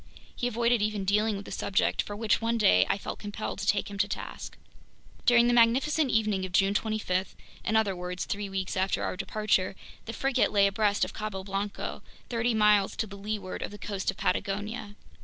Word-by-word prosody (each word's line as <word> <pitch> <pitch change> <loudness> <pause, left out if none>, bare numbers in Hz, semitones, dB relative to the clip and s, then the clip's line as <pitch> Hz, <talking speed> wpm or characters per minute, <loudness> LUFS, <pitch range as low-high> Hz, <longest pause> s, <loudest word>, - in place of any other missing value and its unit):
He 245 - -1
avoided 235 -1 +2
even 210 -2 -1
dealing 210 +2 +2
with 200 0 -7
the - - -9
subject, 200 - +1
for 205 - -6
which 220 +1 +1
one 230 +1 +1
day 90 - +5
I - - +2
felt - - -6
compelled 210 +1 -5
to - - -4
take 205 - +2
him 200 -1 -8
to - - +3
task. - - -6 0.7
During 240 -1 +6
the 240 - +3
magnificent 260 +6 +3
evening 215 -4 +1
of 185 - -4
June 195 +2 +3
25—in 210 0 -2
other 210 -3 +2
words, 180 0 -4
three 200 0 -3
weeks 190 -1 -3
after 190 0 0
our - - -2
departure—the 200 +2 -2
frigate 270 +1 +1
lay 200 -1 +5
abreast 205 +1 +2
of - - -9
Cabo 210 -3 -4
Blanco, 195 +1 -4 0.3
thirty 235 -1 0
miles 210 -2 +4
to 220 - -1
leeward 200 -1 -5
of - - -3
the 205 - -10
coast 200 -2 -3
of - - -3
Patagonia. 205 +3 -2
205 Hz, 190 wpm, -28 LUFS, 195-220 Hz, 0.7 s, During